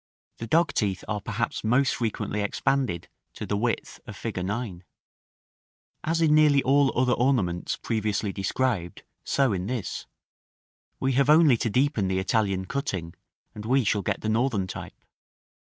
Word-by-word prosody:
The 115 - -5
dogteeth 110 - +1
are 105 -1 -2
perhaps 110 +3 -3
most 125 +4 +3
frequently 110 -2 -2
expanded 100 -3 -1 0.3
to - - -5
the 105 - -1
width 115 +3 -2
of 105 - -8
fig. 100 -5 -4
9. 105 -1 -3
§ - - -15
VII. - - -23 1.2
As 165 +1 0
in 155 -2 +4
nearly 150 -2 +5
all 140 +1 +4
other 125 -1 +3
ornaments 115 -10 0
previously 105 -2 -1
described, 100 -2 -2 0.2
so 135 -5 +2
in 90 0 -3
this, 120 -4 -4 0.9
we 135 - +1
have 135 +2 +2
only 155 -4 +7
to 115 - -1
deepen 125 -3 +1
the 95 0 0
Italian 95 -1 0
cutting, 95 - -3 0.4
and 105 - -8
we 130 +4 +2
shall 105 -1 +1
get - - -2
the - - -3
Northern 110 -3 +1
type. 95 - -9
115 Hz, 155 wpm, -26 LUFS, 100-135 Hz, 1.2 s, only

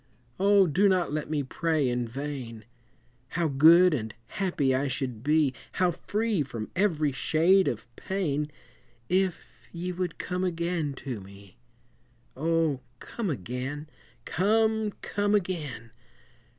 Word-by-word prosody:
O! 200 0 +5
do 190 +5 +3
not 180 -5 +1
let 150 -1 -2
me 150 -2 0
pray 155 +1 0
in 120 -1 -1
vain 125 -4 -6 0.6
How 170 +5 0
good 165 +5 +7
and 110 -6 -3
happy 175 -9 0
I 135 +2 +1
should 125 -4 -3
be, 150 -2 +3 0.2
How 180 -1 +2
free 210 +2 -1
from 115 -6 -5
every 165 -6 +2
shade 170 +8 +3
of 115 - -3
pain, 150 -6 -2 0.6
If 185 -1 +1 0.3
ye 180 +1 -4
would 180 -1 -3
come 180 0 -3
again 170 -4 -1
to 125 -6 -3
me! 100 -1 -15 0.8
O, 160 -1 +1 0.2
come 225 -5 -4
again! 130 - -4 0.4
come, 220 +3 +2
come 205 0 +1
again! 155 - -3
155 Hz, 125 wpm, -28 LUFS, 135-185 Hz, 0.8 s, good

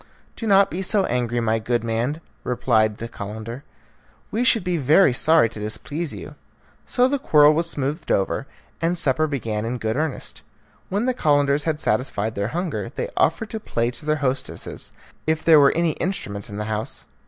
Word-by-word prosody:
"Do 225 - -5
not 195 -1 +5
be 180 - -3
so 195 0 +1
angry, 120 -1 -1
my 110 0 +1
good 120 +1 -1
man," 120 +7 -1 0.2
replied 110 -4 +1
the 115 - -5
Calender; 110 +5 -7 0.7
"we 230 - 0
should 230 -5 +4
be 180 -1 0
very 150 +1 +4
sorry 155 0 +4
to 110 - -9
displease 145 +9 -4
you;" - - -8 0.5
so 250 0 +3
the 280 +1 -1
quarrel 150 -8 +5
was 165 +2 0
smoothed 145 +2 -2
over, 95 - 0 0.3
and 170 +2 +1
supper 155 -1 +3
began 115 -7 -3
in 120 +2 -2
good 110 -1 -2
earnest. 155 -1 -3 0.5
When 205 +5 0
the 255 - +1
Calenders 145 - +2
had 155 -2 -1
satisfied 110 -4 -1
their 100 -1 -2
hunger, 175 +7 -3
they 485 - -4
offered 220 -2 +1
to 220 - -3
play 120 - -1
to 135 - -8
their 155 - +3
hostesses, 130 +1 -3 0.4
if 160 0 0
there 160 -2 +8
were 140 -1 +6
any 170 0 +1
instruments 105 - -4
in 100 - -7
the 105 - -3
house. 110 0 -4
140 Hz, 185 wpm, -23 LUFS, 115-170 Hz, 0.7 s, there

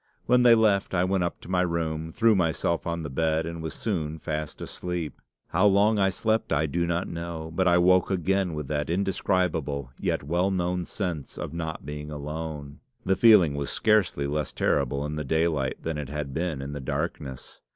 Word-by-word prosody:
When 125 +1 +4
they 120 -1 +7
left, 100 -4 +2
I 90 - +3
went 95 0 +1
up 85 - -3
to - - -12
my 90 0 +1
room, 80 -2 -2
threw 115 +4 +4
myself 85 -2 0
on 85 -1 -2
the 75 - -4
bed, 80 +3 +1
and 85 0 -5
was 80 -1 -5
soon 80 -8 -2
fast 75 -1 -4
asleep. 90 -5 -5 0.3
"How 100 +3 +4
long 100 +2 +4
I 95 -1 +4
slept 110 +4 0
I 75 +2 +2
do 85 +3 -1
not 85 +2 -1
know, 85 -1 -5
but 95 +2 +1
I 85 0 +5
woke 90 +1 +4
again 95 -1 0
with 75 -2 -4
that 75 0 -1
indescribable 85 -7 0
yet - - -1
well 85 +6 +1
known 90 -1 -1
sense 85 -8 -4
of - - -5
not 80 -4 -5
being 75 +1 -6
alone. 75 -1 -6 0.3
The 95 - +3
feeling 105 -10 +6
was 70 -1 -3
scarcely 105 -9 +2
less 75 0 -2
terrible 70 +3 0
in 75 +1 -4
the 75 - -2
daylight 75 -2 0
than 80 -2 -2
it 70 -2 -5
had 75 -2 -4
been 80 -4 -2
in 70 - -5
the 70 - -5
darkness. 65 0 -5
85 Hz, 195 wpm, -26 LUFS, 75-95 Hz, 0.3 s, they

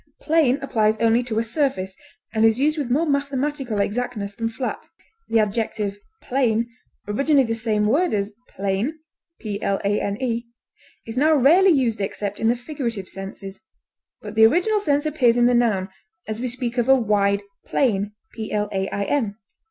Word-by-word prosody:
Plane 300 -5 +3
applies 220 -5 +1
only 230 +1 +3
to 235 -3 -4
a 225 - +2
surface, 230 -7 -1 0.4
and 220 -1 +2
is 225 +1 +4
used 300 +2 +2
with 275 -4 -2
more 295 +7 +2
mathematical 280 -4 -1
exactness 205 -1 -2
than 225 +2 -2
flat. 250 +3 -5 0.4
The 230 - +3
adjective 210 -1 -1 0.2
plain, 235 -3 +1 0.4
originally 275 +7 +3
the 225 -2 -1
same 220 -2 0
word 315 +11 +2
as 205 0 -1 0.2
plane, 200 +10 -2 0.4
is 205 +3 -1 0.8
now 310 +3 +4
rarely 330 +8 +6
used 250 - +2
except 200 +1 -3
in 225 - +1
the 235 - +3
figurative 240 -6 -4
senses, 195 0 -8 0.6
but 210 -1 -7
the 220 0 +7
original 365 - +2
sense 290 -6 +1
appears 255 -6 +3
in 240 - +4
the 245 - +4
noun, 220 -6 +2 0.4
as 220 +1 -4
we 255 - -1
speak 245 0 -3
of 240 +2 0
"a 270 - +8
wide 205 -4 +1 0.2
plain." 210 -5 +1
230 Hz, 145 wpm, -22 LUFS, 210-270 Hz, 0.8 s, a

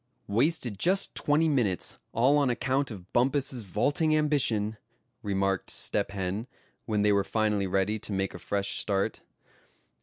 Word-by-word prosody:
"Wasted 120 - 0
just 190 +3 +2
twenty 150 +2 +2
minutes, 120 - 0
all 135 +6 +3
on 140 -3 +2
account 130 +3 0
of 95 -5 -10
Bumpus's 130 0 +1
vaulting 145 - +1
ambition," 120 -8 +1 0.4
remarked 95 -1 -1
Step 100 - 0
Hen, 100 +3 -3 0.4
when 105 -2 +1
they 105 - +4
were 100 0 +3
finally 105 -1 0
ready 95 +3 0
to 105 - -7
make 95 -1 -1
a 90 - -8
fresh 100 +3 -2
start. 100 -2 -1
110 Hz, 145 wpm, -28 LUFS, 100-135 Hz, 0.4 s, they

